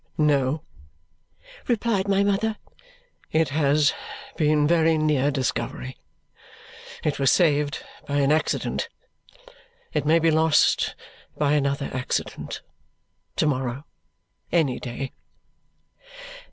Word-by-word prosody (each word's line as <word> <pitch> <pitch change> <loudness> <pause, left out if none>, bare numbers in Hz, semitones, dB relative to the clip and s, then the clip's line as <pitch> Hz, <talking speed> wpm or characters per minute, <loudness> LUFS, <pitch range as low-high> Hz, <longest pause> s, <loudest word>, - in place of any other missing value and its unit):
"No," 145 0 +2 1.0
replied 225 -4 +1
my 200 0 +3
mother. 205 +2 0 0.7
"It 160 -2 +2
has 145 0 +3 0.4
been 150 -2 +3
very 165 -1 +3
near 150 -3 +2
discovery. 130 -2 -2 1.1
It 150 -2 -1
was 135 -1 +4
saved 150 -4 +2 0.2
by 145 - -2
an 140 +1 +3
accident. 155 +1 0 1.0
It 150 - 0
may 160 +2 +5
be 165 0 +3
lost 160 0 +3 0.4
by 145 -1 +2
another 140 -1 0
accident 130 -1 -3 0.7
to - - +1
morrow, 130 -1 -1 0.7
any 155 -7 +2
day." 130 +2 -5
150 Hz, 100 wpm, -24 LUFS, 140-160 Hz, 1.1 s, may